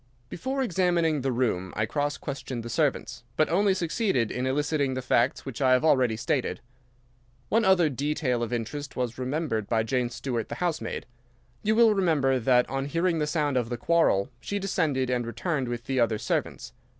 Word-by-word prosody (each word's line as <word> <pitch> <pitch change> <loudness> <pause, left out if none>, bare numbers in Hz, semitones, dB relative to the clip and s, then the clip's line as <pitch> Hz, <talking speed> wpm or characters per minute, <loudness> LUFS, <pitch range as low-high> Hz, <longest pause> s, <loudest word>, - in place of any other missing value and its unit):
"Before 265 +9 -2
examining 170 - +1
the 135 0 0
room 110 -7 -1
I 110 - +1
cross 145 +4 -1
questioned 135 -4 -5
the 120 - -6
servants, 140 -2 -1
but 155 - +3
only 195 +2 +3
succeeded 170 - 0
in 125 +1 -2
eliciting 145 0 0
the 130 - -2
facts 125 +1 +1
which 135 -1 -6
I 130 -1 +5
have 130 +4 +3
already 125 -7 +3
stated. - - -1 0.9
One 225 +1 +3
other 190 -4 +4
detail 140 -3 -1
of 120 -1 -2
interest 130 +5 -4
was 125 -1 -3
remembered 130 -5 -2
by 110 -1 +2
Jane 125 +1 0
Stewart, 120 -2 -4
the - - -4
housemaid. 175 -3 -2 0.6
You 215 +1 +1
will 230 -1 +6
remember 150 -9 +2
that 125 +1 +3
on 135 0 -2
hearing 165 +2 0
the 150 - 0
sound 150 -3 0
of 120 -2 -1
the 120 - -3
quarrel 160 -9 +2
she 200 - -3
descended 155 -10 0
and 120 -2 -1
returned 135 +2 -2
with 120 -1 -4
the 130 +1 -1
other 115 -2 +2
servants. - - -3
135 Hz, 185 wpm, -27 LUFS, 125-165 Hz, 0.9 s, will